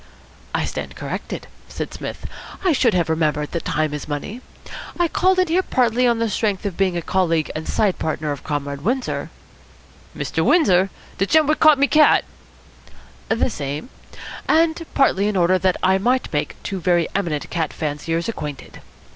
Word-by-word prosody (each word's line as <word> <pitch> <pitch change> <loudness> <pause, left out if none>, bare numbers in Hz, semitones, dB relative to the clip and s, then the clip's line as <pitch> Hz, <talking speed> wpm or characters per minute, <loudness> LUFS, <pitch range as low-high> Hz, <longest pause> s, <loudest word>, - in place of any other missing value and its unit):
"I - - 0
stand - - -5
corrected," - - -5 0.2
said - - -6
Psmith. - - -7 0.4
"I 365 - +5
should 245 -8 +3
have 175 -2 +2
remembered 155 -2 0
that 170 - -4
time 155 -1 0
is 150 - -5
money. 155 - -5 0.6
I 345 - +3
called 370 +3 +2
in 370 0 +3
here 345 +3 +2
partly 250 -6 +2
on 235 -1 +2
the 230 0 0
strength 210 -1 -1
of 195 -4 -2
being 185 -2 +1
a 170 - -3
colleague 165 -4 +1
and 155 +1 -5
side 205 -4 +1
partner 155 -1 -2
of 145 - -5
Comrade 145 -1 -3
Windsor 250 - -2 0.5
" - - -23
"Mr. - - -1
Windsor! 195 - +4 0.3
De 195 - +2
gent 315 +4 +4
what 305 +2 +1
caught 310 -2 +7
my 280 - +4
cat?" 300 +1 +5 1.0
"The 230 +2 +1
same 145 - -5 0.6
and 330 +1 +3
partly 205 -8 +3
in 210 -2 0
order 185 +1 +3
that 185 0 +1
I 190 +1 +4
might 250 +2 0
make 145 - -1
two 195 -2 -4
very 175 -2 +2
eminent 170 -7 -2
cat 165 -2 -1
fanciers 160 +2 -2
acquainted. 150 - -6
190 Hz, 175 wpm, -21 LUFS, 160-250 Hz, 1.0 s, caught